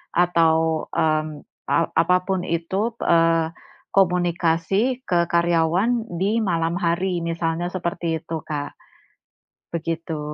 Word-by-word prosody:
atau, 165 Hz, -2 st, +2 dB
mmm, 155 Hz, -2 st, 0 dB, 0.3 s
a 165 Hz, -, +2 dB
apa 180 Hz, +2 st, +3 dB
pun 190 Hz, -1 st, +1 dB
itu, 190 Hz, +7 st, -1 dB
eee, 165 Hz, -1 st, +3 dB, 0.4 s
komunikasi 180 Hz, +6 st, +1 dB
ke 170 Hz, -1 st, +2 dB
karyawan 175 Hz, +8 st, +1 dB
di 210 Hz, +4 st, +1 dB
malam 165 Hz, -3 st, 0 dB
hari, 175 Hz, +1 st, 0 dB
misalnya 165 Hz, 0 st, -1 dB
seperti 170 Hz, -3 st, -2 dB
itu, 165 Hz, -1 st, -4 dB
Kak. 145 Hz, -1 st, -5 dB, 1.0 s
Begitu. 165 Hz, -1 st, -3 dB
170 Hz, 105 wpm, -22 LUFS, 165-180 Hz, 1.0 s, apa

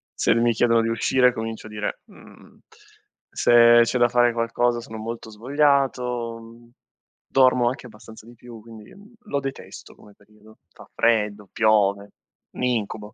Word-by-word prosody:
Se -, -, +2 dB
mi 120 Hz, 0 st, +2 dB
chiedono 115 Hz, +1 st, +2 dB
di 115 Hz, -, -2 dB
uscire 125 Hz, +3 st, +2 dB
comincio 110 Hz, -1 st, -6 dB
a -, -, -12 dB
dire: 105 Hz, -1 st, -5 dB
"Mhmm, -, -, -19 dB, 0.7 s
se 120 Hz, 0 st, +5 dB
c'è 115 Hz, +2 st, -2 dB
da 120 Hz, 0 st, +3 dB
fare 120 Hz, 0 st, +2 dB
qualcosa 120 Hz, +1 st, -1 dB
sono 110 Hz, -1 st, -10 dB
molto 115 Hz, +1 st, -7 dB
svogliato", 125 Hz, -1 st, -1 dB
mhmm, 115 Hz, +1 st, -17 dB, 0.6 s
dormo 130 Hz, -2 st, +3 dB
anche 130 Hz, -, -8 dB
abbastanza 110 Hz, 0 st, -15 dB
di 120 Hz, +1 st, -16 dB
più 120 Hz, -1 st, -13 dB
quindi, 110 Hz, -1 st, -14 dB
mhmm, 205 Hz, +4 st, -18 dB
lo 145 Hz, -9 st, -2 dB
detesto 135 Hz, -1 st, -9 dB
come 105 Hz, -, -19 dB
periodo. 105 Hz, +1 st, -22 dB
Fa -, -, -17 dB
freddo, 105 Hz, -3 st, 0 dB
piove, 100 Hz, -2 st, +1 dB, 0.4 s
un -, -, -7 dB
incubo. 110 Hz, -3 st, -3 dB
115 Hz, 155 wpm, -22 LUFS, 110-120 Hz, 0.7 s, se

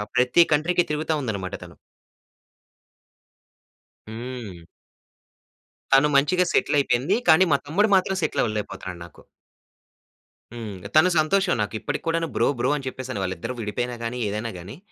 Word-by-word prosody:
ప్రతి 125 Hz, +7 st, +4 dB
కంట్రీకి 170 Hz, +4 st, +2 dB
తిరుగుతా 155 Hz, +1 st, -1 dB
ఉందన్నమాట 100 Hz, -7 st, -4 dB
తను. -, -, -13 dB, 2.3 s
హ్మ్. 110 Hz, -7 st, -8 dB, 1.3 s
తను 135 Hz, +2 st, +6 dB
మంచిగాసెటిలయిపోయింది. 145 Hz, -, +2 dB
కానీ 170 Hz, +4 st, +7 dB
మా -, -, +4 dB
తమ్ముడు 205 Hz, +8 st, +2 dB
మాత్రం 190 Hz, 0 st, +1 dB
సెటిల్ -, -, 0 dB
అవ్వలేక 105 Hz, -2 st, -2 dB
పోతున్నాడు 90 Hz, -2 st, -8 dB
నాకు. -, -, -17 dB, 1.3 s
హ్మ్. 110 Hz, -4 st, -6 dB, 0.2 s
తను 165 Hz, +4 st, +6 dB
సంతోషం 185 Hz, +4 st, +2 dB
నాకిప్పటికి 105 Hz, +1 st, -3 dB
కూడాను 165 Hz, 0 st, 0 dB
బ్రో -, -, +2 dB
బ్రో 125 Hz, -, +1 dB
అని 140 Hz, -2 st, -5 dB
చెప్పేస‌నే 130 Hz, -4 st, -5 dB
వాళ్ళిద్దరు 95 Hz, +5 st, -4 dB
విడిపోయినా 120 Hz, +3 st, -3 dB
గాని 115 Hz, +2 st, -3 dB
ఏదైనా 110 Hz, +3 st, -3 dB
గాని. 100 Hz, -, -10 dB
130 Hz, 120 wpm, -24 LUFS, 110-160 Hz, 2.3 s, కానీ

